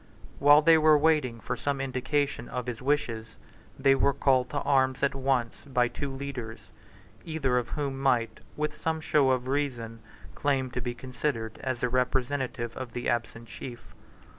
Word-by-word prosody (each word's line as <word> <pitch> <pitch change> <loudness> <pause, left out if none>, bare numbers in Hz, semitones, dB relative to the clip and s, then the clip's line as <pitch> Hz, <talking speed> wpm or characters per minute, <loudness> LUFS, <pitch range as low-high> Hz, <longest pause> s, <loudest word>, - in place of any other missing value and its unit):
While 145 +2 +7
they 165 0 +6
were 155 -1 +6
waiting 145 -6 +2
for - - -3
some 140 -1 -2
indication 135 +2 -1
of 125 -1 -4
his 125 -2 -5
wishes, 115 -6 -1 0.4
they 135 0 +4
were 140 +1 +2
called 130 -2 +2
to 145 - -3
arms 130 -1 +2
at 140 - +2
once 130 -3 0
by 125 -3 +1
two 140 +2 -4
leaders, 125 -7 -7 0.5
either 135 -6 0
of 120 - -6
whom 140 -2 -3
might, 125 -4 +1 0.2
with 150 0 -1
some 160 +1 -2
show 150 -4 +3
of 130 -1 +1
reason, 125 -5 -2 0.3
claim 135 -3 0
to 125 - -3
be 120 0 -3
considered 125 -3 -3
as 130 -2 -3
the 125 - +1
representative 125 -1 -1
of 130 -3 -7
the 120 - -2
absent 115 0 -2
chief. 120 0 -9
130 Hz, 165 wpm, -28 LUFS, 120-145 Hz, 0.5 s, While